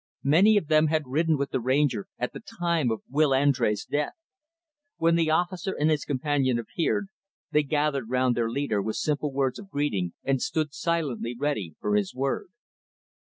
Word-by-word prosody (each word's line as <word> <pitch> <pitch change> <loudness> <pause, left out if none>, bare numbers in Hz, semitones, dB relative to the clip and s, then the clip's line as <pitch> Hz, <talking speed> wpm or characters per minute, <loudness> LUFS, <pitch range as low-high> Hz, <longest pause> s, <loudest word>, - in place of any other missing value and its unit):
Many 190 +10 +5
of 200 - +1
them 155 0 +4
had 155 -1 0
ridden 155 +4 +1
with 140 0 -2
the - - 0
Ranger 130 -3 +1
at 125 - -3
the - - -7 0.2
time 170 -6 +1
of 110 - -3
Will 150 +2 +2
Andrés' 130 -6 +2
death. 145 +1 -1 0.8
When 165 0 +3
the 165 -1 +2
officer 175 +3 0
and 155 +2 +3
his 150 -2 0
companion 135 -2 +1
appeared, 170 - -1 0.4
they 150 - +4
gathered 145 -4 -1
round 125 0 +2
their 115 -1 0
leader 115 -5 -1
with 110 +2 -3
simple 150 -1 -1
words 135 -2 -1
of 200 - -11
greeting, 110 - -1
and 135 -2 0
stood 155 -3 -1
silently 150 -8 -2
ready 115 - -2
for 105 0 0
his 100 -2 0
word. 135 +1 -1
145 Hz, 175 wpm, -26 LUFS, 125-155 Hz, 0.8 s, Many